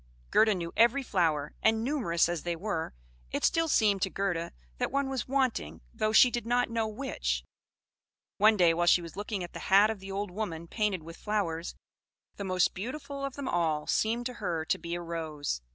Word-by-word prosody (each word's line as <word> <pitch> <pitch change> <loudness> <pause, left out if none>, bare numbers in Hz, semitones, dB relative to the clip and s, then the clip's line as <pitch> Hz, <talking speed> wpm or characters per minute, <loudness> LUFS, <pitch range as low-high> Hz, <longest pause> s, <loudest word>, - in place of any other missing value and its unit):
Gerda 215 -2 +5
knew 170 -2 -5
every 240 +5 +4
flower; 160 - 0
and, 220 0 +3
numerous 230 - +1
as 175 -2 -2
they 175 -1 -2
were, 165 - -3 0.3
it - - -3
still 330 0 +2
seemed 205 -9 +3
to 190 - +1
Gerda 180 -4 -2 0.3
that - - -1
one 275 0 0
was 265 -2 -3
wanting, 255 - -1
though 215 - 0
she 245 +3 +7
did 240 - -2
not 245 +1 +1
know 225 -1 0
which. 245 +6 -2 1.0
One 215 +1 +6
day 175 -3 +5
while 175 +1 0
she 175 0 +5
was 165 - -9
looking 205 -1 -3
at 175 - -8
the - - -6
hat 200 +3 +6
of 220 - -6
the 195 +1 -8
old 200 0 -3
woman 170 -5 -4
painted 205 -4 -1
with 165 +1 -10
flowers, 180 -6 -2 0.6
the 200 - -4
most 185 -2 +2
beautiful 275 +6 -6
of 275 -1 -3
them 280 - -5
all 160 -3 0
seemed 230 +2 0
to 250 - -3
her 165 -3 -1
to 190 - 0
be 170 +1 -4
a 175 - -4
rose. 160 - -4
195 Hz, 200 wpm, -29 LUFS, 170-230 Hz, 1.0 s, she